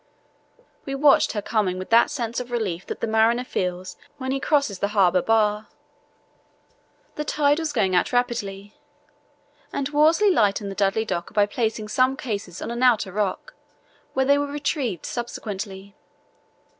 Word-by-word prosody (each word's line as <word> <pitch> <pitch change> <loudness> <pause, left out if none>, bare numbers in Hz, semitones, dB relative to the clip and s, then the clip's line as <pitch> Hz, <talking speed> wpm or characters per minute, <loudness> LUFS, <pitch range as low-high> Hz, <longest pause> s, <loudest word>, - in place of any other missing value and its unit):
We 275 - -4
watched 280 0 +4
her 210 -2 -3
coming 205 -5 0
with 185 +3 -7
that 230 +1 +6
sense 235 -3 -3
of 250 -1 -6
relief 200 -7 -3
that - - -6
the - - +1
mariner 225 +2 +3
feels 180 -5 -4 0.2
when 260 -1 -4
he 270 - -1
crosses 280 - +1
the 200 - +1
harbour 185 -2 +4
bar. 215 0 +1 1.5
The 300 - -1
tide 295 0 +2
was 320 -2 -2
going 200 -8 +1
out 180 - +2
rapidly, 210 -5 -2 1.0
and 275 0 -2
Worsley 320 +7 +4
lightened 205 - +1
the - - -7
Dudley 205 +3 +1
Docker 170 -5 -4
by 205 -1 +5
placing 220 0 -2
some 255 +4 +2
cases 200 -7 -5
on - - -4
an 235 +1 -4
outer 230 -6 +3
rock, 210 - -3 0.6
where 265 - +1
they 280 +1 +4
were 285 - -1
retrieved 285 - -2
subsequently. 200 -4 -6
225 Hz, 155 wpm, -23 LUFS, 200-265 Hz, 1.5 s, that